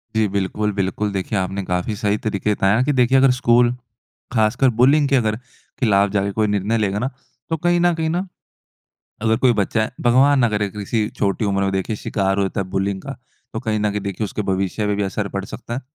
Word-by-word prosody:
जी। 110 -1 +3
बिल्कुल, 100 +2 -1
बिल्कुल 100 +2 -1
देखिए 95 +2 -2
आपने 95 +1 -3
काफ़ी 90 +4 -2
सही 105 -1 0
तरीके 105 -1 0
बताया 100 +4 +2
कि 145 - +1
देखिए, 130 +1 +3
अगर 135 -1 +5
स्कूल 120 -1 +3 0.6
ख़ासकर 115 +4 +3
बुलिंग 140 +3 +5
के 140 - +3
अगर 110 -4 +1 0.4
खिलाफ 100 -4 +3
जाके 100 -1 0
कोई 110 +1 0
निर्णय 105 +2 0
लेगा 105 -2 0
ना, 130 - -1 0.4
तो 160 - 0
कहीं 175 +2 +2
न 175 0 +3
कहीं 160 -1 -1
ना 180 +4 -2 1.0
अगर 110 0 +2
कोई 125 - +6
बच्चा 110 +3 0
है, - - -2
भगवान 130 +4 +4
ना 120 - +4
करे 105 -1 -1
किसी 105 +2 -2
छोटी 100 +2 0
उम्र 100 -1 0
में 95 0 0
देखिए 95 +3 -2
शिकार 95 -2 -1
हो 100 - +2
जाता 95 0 -2
है 95 - -3
बुलिंग 95 0 -1
का। 135 - -6 0.4
तो 110 - -4
कहीं 110 -3 -1
न 105 - +1
कहीं 105 0 -3
देखिए 100 +2 -3
उसके 105 +1 -3
भविष्य 95 +2 -1
पे 105 - +1
भी 105 - -1
असर 100 +1 -2
पड़ 100 - -2
सकता 120 +3 -7
है। 130 - -3
105 Hz, 220 wpm, -20 LUFS, 100-120 Hz, 1.0 s, कोई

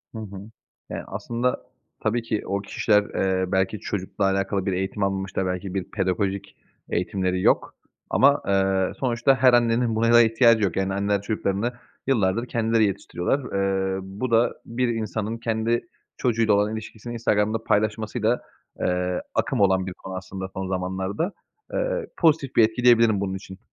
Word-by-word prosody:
Hı - - -4
hı. 100 -1 -8 0.4
Eee, - - -4
aslında 120 +2 -2 0.4
tabii 115 +3 0
ki 115 -2 -2
o 100 +1 -1
kişiler, 105 +1 +2
eee, 95 -2 -1
belki 95 +2 +1
çocukla 95 +1 -3
alakalı 95 0 0
bir 95 - 0
eğitim 95 +2 -2
almamış 95 -1 -2
da 95 - 0
belki 90 +1 -3
bir 95 -2 -1
pedagojik 95 0 -1 0.3
eğitimleri 90 +1 -1
yok - - +2 0.3
ama, 140 +2 +4
eee, 95 -1 +2
sonuçta 130 +1 +2
her 130 -1 +5
annenin 120 -1 +3
buna 115 +1 +3
da 120 - +9
ihtiyacı 115 -1 +4
yok, 95 -4 0
yani, 95 0 0
anneler 100 0 0
çocuklarını 105 +2 -1 0.3
yıllardır 115 -2 +1
kendileri 115 -2 +2
yetiştiriyorlar. 95 +4 -1 0.6
Eee, - - -3
bu 100 +6 -5
da 115 +1 +4
bir 125 +2 -1
insanın 110 -1 -2
kendi 115 +4 -1 0.3
çocuğuyla 115 -4 +2
olan 105 +2 +2
ilişkisini 110 +1 -7
Instagram'da 110 -1 0
paylaşmasıyla, 110 +3 0 0.4
eee, 90 0 0
akım - - 0
olan 95 -1 +3
bir 95 - -5
konu 95 +1 -9
aslında 95 0 -6
son 95 -1 -4
zamanlarda. 95 - -2 0.4
Eee, - - -1
pozitif 155 -5 +2
bir 115 - +7
etki 110 +3 -4
diyebilirim 115 -4 +5
bunun 95 -1 -2
için. 95 0 -9
105 Hz, 155 wpm, -24 LUFS, 95-115 Hz, 0.6 s, da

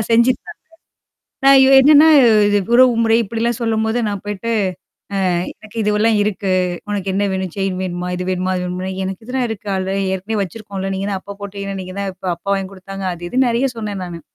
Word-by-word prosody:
செஞ்சுருதாங்க 255 +9 +2 0.9
நான் 275 0 +8
இ - - +6
என்னான்னா 295 +3 +7 0.4
இது 205 0 +3 0.2
உறவு 250 0 +6
முறை 225 0 +4
இப்படிலாம் 230 +2 -2
சொல்லும்போது, 225 0 0
நான் 200 -2 -3
போய்ட்டு. 205 +3 -4 0.8
அ, - - +1 0.3
எனக்கு 215 +1 -15
இதுவெல்லாம் 210 +1 +2
இருக்கு. 200 -2 -1 0.4
உனக்கு 195 -2 -2
என்னா 200 +2 +1
வேணும்? 190 -2 -3
செயின் 195 -1 -2
வேணுமா? 180 -1 -4
இது 180 0 -4
வேணுமா? 185 0 -1
அது 180 - -2
வேணுமான்னா, 185 +1 -4
எனக்கு 190 +3 -5
இதுல்லாம் 250 0 -1
இருக்கு. 215 -2 -6
அல்ரெடி 190 +1 -1
ஏற்கனவே 205 +3 -3
வச்சிருக்கோம்ல, 195 0 -5
நீங்க 195 +1 -3
தான் 190 -1 -3
அப்ப 200 0 -10
போட்டீங்கல்ல! 200 0 -6
ஏன - - -5
நீங்க 185 0 -9
தான் 195 -1 -2
இப்ப 185 0 -4
அப்பா 175 - -12
வாங்கி 195 -1 -3
குடுத்தாங்க. 195 0 -8
அது 175 0 -7
இதுன்னு 255 0 +2
நெறையா 240 +4 +1
சொன்னேன் 210 -3 -4
நானு. 170 -1 -8
200 Hz, 190 wpm, -18 LUFS, 190-225 Hz, 0.9 s, நான்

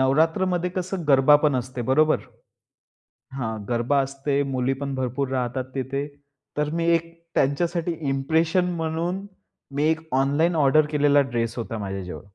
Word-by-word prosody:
नवरात्रमध्ये 165 +6 +2
कसं 185 0 -4
गरबा 135 +1 +7
पण 150 -1 +1
असते 130 0 -4
बरोबर? 155 +3 +4 1.1
हां, 110 -4 -3
गरबा 120 +4 +1
असते. 140 +1 -1
मुली 130 -1 0
पण 140 -1 -3
भरपूर 130 +1 -2
राहतात 130 0 -1
तिथे. 135 +2 -2 0.5
तर 150 0 +1
मी 170 0 0
एक 165 0 -3 0.2
त्यांच्यासाठी 170 +5 +1 0.2
इम्प्रेशन 160 +6 +1
म्हणून 170 +4 -2 0.5
मी 145 - +1
एक 160 0 +1
ऑनलाईन 145 +6 +2
ऑर्डर 150 0 +4
केलेला 145 -1 +4
ड्रेस 120 -4 -2
होता 115 -1 -4
माझ्याजवळ. 95 -3 -5
140 Hz, 135 wpm, -24 LUFS, 130-160 Hz, 1.1 s, गरबा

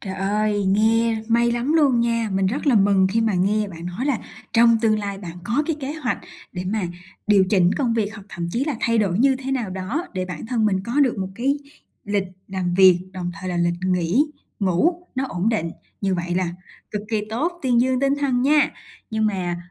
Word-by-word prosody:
Trời 190 -1 -5
ơi, 205 +1 0
nghe 220 +2 +2
may 235 +1 +3
lắm 240 +6 0
luôn 275 -7 +4
nha. 230 -2 0
Mình 190 0 +2
rất 265 +9 -2
là 265 - +5
mừng 195 -2 +4
khi 230 - +1
mà 220 -3 +1
nghe 205 +3 +1
bạn 170 -1 -8
nói 190 +10 -3
là 270 -6 +1 0.3
trong 230 0 +5
tương 215 -2 +2
lai 200 -1 -4
bạn 175 -3 -8
có 240 +10 +1
cái 325 - -1
kế 275 +2 -3
hoạch 290 -6 -2 0.3
để 180 -1 -5
mà 195 -1 -1 0.4
điều 205 -2 +5
chỉnh 180 -4 +4
công 245 -5 +1
việc 220 -1 -1
hoặc 205 -2 -11
thậm 170 -3 -4
chí 250 +4 0
là 295 -4 -2
thay 230 -1 +2
đổi 195 -2 +1
như 265 +1 +4
thế 270 +1 -4
nào 235 -7 -2
đó 200 - -3
để 185 -1 -1
bản 180 +2 -7
thân 230 -2 0
mình 190 -2 +1
có 245 +5 0
được 255 -7 +2
một 190 -1 -2
cái 275 +5 0 0.5
lịch 205 -1 0 0.2
làm 185 -2 -2
việc, 185 -2 +6
đồng 180 -2 -4
thời 185 - -5
là 175 - -2
lịch 170 0 +1
nghỉ, 180 - +2 0.4
ngủ, 335 - +1
nó 265 +1 -1
ổn 185 +5 -1
định. 170 -8 0 0.3
Như 195 -2 +1
vậy 175 0 -2
là 180 -2 0 0.4
cực 210 -1 -3
kỳ 220 - +1
tốt, 305 +10 0
tuyên 245 -2 +3
dương 255 0 +1
tinh 275 0 +2
thần 255 -3 +1
nha! 295 +2 +4 0.4
Nhưng 220 0 +1
mà 180 -3 -3
215 Hz, 225 wpm, -22 LUFS, 185-245 Hz, 0.5 s, việc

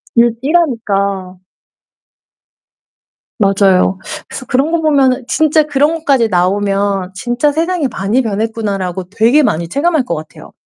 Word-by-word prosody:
일 235 -1 +4
일하니까. 200 - -1 2.0
맞아요. 195 -2 +2 0.3
그래서 260 - -8
그런 275 +5 +1
거 335 -1 0
보면은 270 -4 +2
진짜 310 +3 +2
그런 295 +2 +1
것까지 270 -7 +2
나오면 195 0 0
'진짜 240 +8 0
세상이 330 -2 0
많이 225 +3 -1
변했구나.'라고 200 -4 -3
되게 230 +8 +3
많이 170 -7 -1
체감할 310 - +1
것 170 - -3
같아요. 155 0 -10
230 Hz, 285 characters per minute, -14 LUFS, 195-285 Hz, 2.0 s, 일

